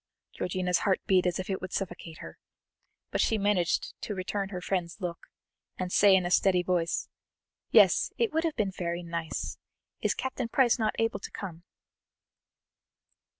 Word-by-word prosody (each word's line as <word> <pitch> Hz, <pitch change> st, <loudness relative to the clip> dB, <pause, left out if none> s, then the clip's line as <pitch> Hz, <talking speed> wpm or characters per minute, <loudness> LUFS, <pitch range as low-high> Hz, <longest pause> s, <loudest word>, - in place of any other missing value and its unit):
Georgiana's 180 Hz, 0 st, 0 dB
heart 190 Hz, -2 st, +2 dB
beat 185 Hz, -1 st, +3 dB
as 175 Hz, -, 0 dB
if 185 Hz, -, -4 dB
it 190 Hz, -1 st, -2 dB
would 185 Hz, 0 st, -6 dB
suffocate 175 Hz, -4 st, -4 dB
her, -, -, -10 dB, 0.7 s
but -, -, +1 dB
she 225 Hz, -, +2 dB
managed 200 Hz, -4 st, +1 dB
to 210 Hz, -, -4 dB
return 195 Hz, +1 st, -2 dB
her 185 Hz, -3 st, -4 dB
friend's 180 Hz, -1 st, -2 dB
look, 175 Hz, -3 st, -5 dB, 0.5 s
and 180 Hz, -1 st, -3 dB
say 200 Hz, 0 st, +6 dB
in 185 Hz, -1 st, +2 dB
a 175 Hz, -, -2 dB
steady 180 Hz, -1 st, +4 dB
voice: 175 Hz, -2 st, 0 dB, 0.6 s
"Yes, -, -, +5 dB
it 460 Hz, -6 st, +1 dB
would 320 Hz, +1 st, +1 dB
have 325 Hz, -2 st, -1 dB
been 200 Hz, -3 st, 0 dB
very 175 Hz, -1 st, -3 dB
nice. 170 Hz, -1 st, -4 dB, 0.4 s
Is -, -, 0 dB
Captain 260 Hz, -2 st, -3 dB
Price 245 Hz, -1 st, +3 dB
not 215 Hz, -1 st, +1 dB
able 225 Hz, 0 st, 0 dB
to -, -, -7 dB
come?" 175 Hz, -5 st, -8 dB
185 Hz, 165 wpm, -29 LUFS, 175-205 Hz, 0.7 s, say